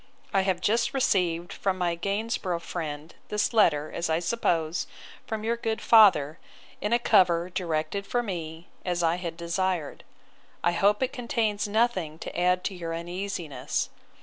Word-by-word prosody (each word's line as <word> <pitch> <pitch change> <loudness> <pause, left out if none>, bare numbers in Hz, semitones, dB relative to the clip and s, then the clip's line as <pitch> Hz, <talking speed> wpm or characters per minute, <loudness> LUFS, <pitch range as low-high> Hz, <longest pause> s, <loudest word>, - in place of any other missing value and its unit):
I 195 - +4
have 190 -2 0
just 230 +5 +1
received, 180 -7 +1
from 195 -2 -1
my 175 -2 0
Gainsborough 195 -1 -2
friend, 155 -2 -5 0.2
this 210 +2 0
letter, 155 -9 +3
as 170 - -2
I 160 - +2
suppose, 170 -4 0 0.4
from 220 -1 -3
your 230 +1 +1
good 225 -1 -2
father, 185 -10 +5 0.4
in 210 - -1
a 235 - +5
cover, 180 -6 +3
directed 175 +3 -2
for 245 0 0
me, 165 -5 -6 0.2
as 175 -1 -1
I 165 +1 +2
had 170 -2 -5
desired. 170 -1 -2 0.6
I 175 - +4
hope 205 +6 +2
it 260 - -1
contains 225 -4 -1
nothing 205 -8 0
to - - -8
add 180 +1 +2
to 200 - -2
your 165 -2 -4
uneasiness. 175 -2 -3
180 Hz, 155 wpm, -27 LUFS, 170-210 Hz, 0.6 s, father